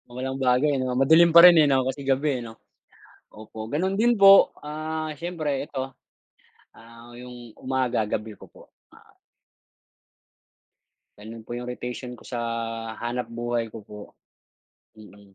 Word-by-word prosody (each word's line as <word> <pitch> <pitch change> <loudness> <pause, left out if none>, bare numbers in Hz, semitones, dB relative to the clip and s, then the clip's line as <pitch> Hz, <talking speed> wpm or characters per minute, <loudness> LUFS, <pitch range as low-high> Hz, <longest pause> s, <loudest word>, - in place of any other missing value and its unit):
Walang 130 +1 -4
bago 130 +1 +2
ano? 130 -3 -1
Madilim 160 +5 +5
pa - - +11
rin 175 - +9
eh, - - +4
'no, 130 -2 +2
kasi 135 +2 -4
gabi 135 0 0
eh, - - -7
'no? 115 - -10 0.8
Opo 110 +1 -10
gano'n 185 +6 -1
din 240 +2 +3
po, 195 0 +8
ah, 155 +1 -5
siyempre 170 -3 -4 0.2
eto, 135 -1 -6 0.8
ah, 115 +1 -16
'yung 120 -2 -12
umaga, 130 -3 -1
gabi 105 0 -5
ko - - -14
po. - - -17 0.3
Ma - - -18 2.2
Gano'n 110 +2 -11
po 120 - -10
'yung 125 +1 -6
rotation 125 0 -7
ko - - -19
sa 120 - -5 0.6
hanapbuhay 120 -1 -4
ko 110 -1 -11
po, 105 0 -11 1.0
mm. 100 -2 -17
125 Hz, 140 wpm, -24 LUFS, 115-145 Hz, 2.2 s, pa